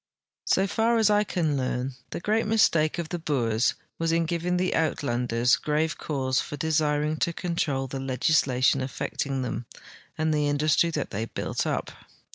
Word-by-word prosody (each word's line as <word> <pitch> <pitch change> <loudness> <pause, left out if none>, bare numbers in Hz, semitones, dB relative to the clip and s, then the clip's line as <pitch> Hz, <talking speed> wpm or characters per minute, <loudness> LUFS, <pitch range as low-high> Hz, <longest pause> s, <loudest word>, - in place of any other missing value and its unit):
So 195 - +3
far 225 +3 +1
as 220 -2 +4
I 210 0 +4
can 165 -7 -1
learn, 130 0 -2 0.2
the - - -5
great 215 +4 0
mistake 165 -8 +3
of 170 -2 -4
the 175 - -3
Boers 120 -7 +1 0.2
was 165 0 +1
in 165 0 +2
giving 175 +2 -1
the 180 0 0
Uitlanders 125 -6 +1
grave 155 +1 0
cause 135 -3 0
for 145 - -6
desiring 150 0 +1
to 170 - 0
control 160 -7 -1
the 135 +1 -5
legislation 135 0 +2
affecting 135 0 -3
them 120 -1 -4 0.5
and 155 0 +1
the 150 -1 +1
industiw 155 +3 +2
the}' 145 -9 -3
had 115 - -5
built - - -2
up. - - -2
150 Hz, 165 wpm, -26 LUFS, 135-170 Hz, 0.5 s, as